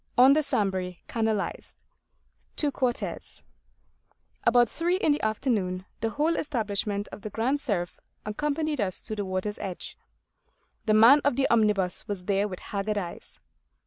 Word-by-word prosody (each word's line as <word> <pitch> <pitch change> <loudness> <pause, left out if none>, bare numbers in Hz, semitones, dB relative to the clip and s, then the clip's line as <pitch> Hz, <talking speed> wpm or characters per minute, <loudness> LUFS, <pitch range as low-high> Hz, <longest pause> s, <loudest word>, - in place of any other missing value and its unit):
ON 260 +3 +8
THE 310 - +3
SAMBRE 190 -8 -1
CANALISED: 220 -3 -2 0.7
TO 295 -2 +1
QUARTES 250 -2 -3 1.0
ABOUT 240 +1 +5
three 340 +9 0
in 320 - +2
the 290 - 0
afternoon 210 -5 -1
the 225 - 0
whole 305 +8 0
establishment 210 -6 -2
of - - -9
the 215 - -5
Grand 255 +7 0
Cerf 175 -8 -2 0.3
accompanied 295 +5 -1
us 185 -3 0
to 215 - -4
the 205 -1 -3
water's 185 +2 -3
edge. 190 -3 -6 0.9
The 215 - +4
man 240 +7 +8
of 285 -3 +2
the 275 +1 +2
omnibus 210 -5 +2
was 195 -4 -4
there 200 +1 +1
with 185 -3 -6
haggard 205 +1 -2
eyes. 175 -4 -6
215 Hz, 145 wpm, -27 LUFS, 200-265 Hz, 1.0 s, ON